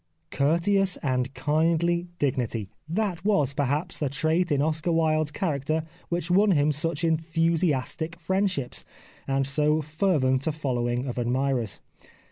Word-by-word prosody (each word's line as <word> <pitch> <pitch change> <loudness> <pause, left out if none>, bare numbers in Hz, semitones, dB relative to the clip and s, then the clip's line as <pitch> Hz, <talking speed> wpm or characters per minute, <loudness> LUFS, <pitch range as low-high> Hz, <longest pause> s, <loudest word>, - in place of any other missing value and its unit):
Courteous 180 +6 +2
and 130 -1 0
kindly 165 +5 +1
dignity": 120 - -1 0.2
that 185 -1 -1
was, 150 -10 +2
perhaps, 145 +4 -1
the 145 - 0
trait 160 +5 0
in 145 - +2
Oscar 155 +3 0
Wilde's 155 -2 +2
character 155 -2 -1 0.3
which 175 0 -2
won 205 +4 +5
him 150 -1 +3
such 150 +2 -1
enthusiastic 165 -1 0
friendships, 190 -6 -1 0.4
and 135 0 +1
so 150 +2 +2
fervent 155 -4 +1
a - - +2
following 125 -4 -1
of 125 -2 -3
admirers. 125 -2 -1
155 Hz, 125 wpm, -26 LUFS, 135-170 Hz, 0.4 s, won